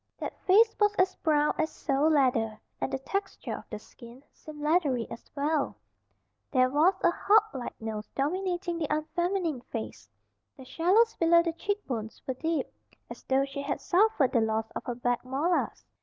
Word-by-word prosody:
That -, -, -5 dB
face 435 Hz, +4 st, +6 dB
was 415 Hz, 0 st, +3 dB
as 370 Hz, 0 st, +2 dB
brown 300 Hz, -1 st, +2 dB
as 315 Hz, 0 st, +1 dB
sole 285 Hz, 0 st, 0 dB
leather, 245 Hz, -7 st, +2 dB, 0.2 s
and -, -, -1 dB
the 270 Hz, -, 0 dB
texture 395 Hz, +9 st, -4 dB
of -, -, -13 dB
the -, -, -5 dB
skin 240 Hz, +2 st, -14 dB
seemed 305 Hz, -1 st, -12 dB
leathery 295 Hz, -6 st, +1 dB
as 230 Hz, -, -10 dB
well. 295 Hz, +1 st, 0 dB, 0.7 s
There 255 Hz, 0 st, +3 dB
was 320 Hz, +7 st, +4 dB
a 345 Hz, -, +5 dB
hawklike 415 Hz, -, +1 dB
nose 215 Hz, -1 st, -5 dB
dominating 350 Hz, +3 st, -1 dB
the 310 Hz, -, -1 dB
unfeminine 325 Hz, 0 st, -1 dB
face. 110 Hz, -, -7 dB, 0.5 s
The 265 Hz, -, -11 dB
shallows 385 Hz, -, +3 dB
below 335 Hz, 0 st, +5 dB
the 335 Hz, -1 st, -1 dB
cheekbones 280 Hz, -, -4 dB
were 260 Hz, -, -2 dB
deep, 320 Hz, +5 st, -1 dB, 0.5 s
as -, -, -9 dB
though 270 Hz, +1 st, +2 dB
she 275 Hz, 0 st, -6 dB
had 280 Hz, 0 st, -3 dB
suffered 365 Hz, -, +3 dB
the 235 Hz, -, +3 dB
loss 220 Hz, 0 st, 0 dB
of -, -, -6 dB
her 245 Hz, -, -3 dB
back 245 Hz, 0 st, -1 dB
molars. 285 Hz, +8 st, -1 dB
300 Hz, 170 wpm, -28 LUFS, 255-350 Hz, 0.7 s, face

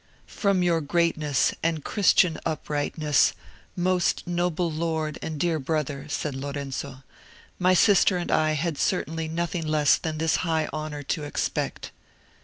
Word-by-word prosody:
"From 200 Hz, -3 st, 0 dB
your 170 Hz, -2 st, +2 dB
greatness 155 Hz, -2 st, +1 dB
and 160 Hz, -2 st, -1 dB
Christian 180 Hz, -5 st, +3 dB
uprightness, 150 Hz, -1 st, +1 dB, 0.4 s
most 180 Hz, 0 st, +1 dB
noble 175 Hz, -1 st, -1 dB
lord 160 Hz, -1 st, -2 dB
and 155 Hz, -2 st, -5 dB
dear 165 Hz, -1 st, +1 dB
brother," 145 Hz, -1 st, -2 dB
said 145 Hz, 0 st, -2 dB
Lorenzo, 140 Hz, -1 st, -5 dB, 0.6 s
"my 185 Hz, 0 st, +4 dB
sister 195 Hz, -1 st, +5 dB
and 175 Hz, -, -3 dB
I 155 Hz, 0 st, +3 dB
had 155 Hz, 0 st, -2 dB
certainly 165 Hz, -3 st, -1 dB
nothing 165 Hz, 0 st, -2 dB
less 150 Hz, -1 st, +4 dB
than 160 Hz, -1 st, -4 dB
this 160 Hz, 0 st, +1 dB
high 160 Hz, -3 st, 0 dB
honour 155 Hz, -1 st, -4 dB
to 150 Hz, +2 st, -2 dB
expect." 145 Hz, -, -3 dB
160 Hz, 135 wpm, -25 LUFS, 150-170 Hz, 0.6 s, sister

